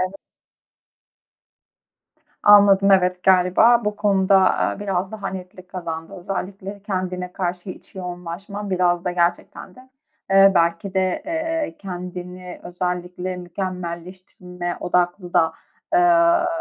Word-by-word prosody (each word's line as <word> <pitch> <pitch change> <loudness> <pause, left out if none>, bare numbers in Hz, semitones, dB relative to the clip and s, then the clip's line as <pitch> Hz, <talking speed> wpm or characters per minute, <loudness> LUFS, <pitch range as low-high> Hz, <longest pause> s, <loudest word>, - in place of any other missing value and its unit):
evet. 185 +2 -3 2.2
Anladım, 200 -1 +6
evet. 180 -1 +2
Galiba 190 +6 +4
bu 210 0 -2
konu 195 -3 +1
da, 195 - +6
aaa, 190 +1 +1
biraz 195 -1 -2
daha 205 -3 -5
netlik 185 -1 -9
kazandı. 165 -1 -6
Özellikle, 195 +2 -6
kendine 185 -2 -4
karşı 180 0 -4
iç 185 - -12
yoğunlaşman 185 +3 -6
biraz 175 -1 +1
da 180 - 0
gerçekten 175 +1 -2
de, 255 +1 -17 0.4
eee, 195 0 +7
belki 170 +3 +1
de, 185 -1 0
eee, 325 -1 -2
kendini 180 -1 -8
özellikle 180 +1 -4
mükemmelleştirme 180 0 -6
odaklı 180 0 -1
da, 160 0 +3 0.4
eee, 340 -1 +4
185 Hz, 110 wpm, -21 LUFS, 180-195 Hz, 2.2 s, eee